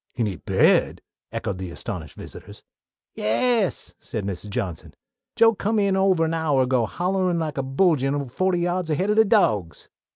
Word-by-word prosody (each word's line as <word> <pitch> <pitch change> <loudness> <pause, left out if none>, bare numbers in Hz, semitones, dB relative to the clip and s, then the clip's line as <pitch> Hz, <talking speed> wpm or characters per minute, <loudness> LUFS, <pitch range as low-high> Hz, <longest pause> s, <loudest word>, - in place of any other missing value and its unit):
"In 120 -3 0
he 95 -4 -3
bed?" - - +2 0.3
echoed 95 -2 -4
the 95 -1 -5
astonished 85 - -7
visitors. - - -11 0.5
"Yass," 215 - 0
said 110 -4 -5
Mrs. 100 +1 -5
Johnson. 100 -7 -5 0.4
"Joe 225 0 +5
come 215 +2 -1
in 200 -2 +2
ovah 190 -3 +3
an 165 0 0
hour 155 -5 +1
ago 125 -3 +1
hollerin' 185 0 -1
like 155 -4 -3
a - - -1
bullgine 140 -1 +1
fohty 185 +2 0
yahds 175 -1 -1
ahead 185 +7 0
o' - - +3
de 220 +1 +5
dawgs." 110 - +1
160 Hz, 165 wpm, -23 LUFS, -, 0.5 s, Joe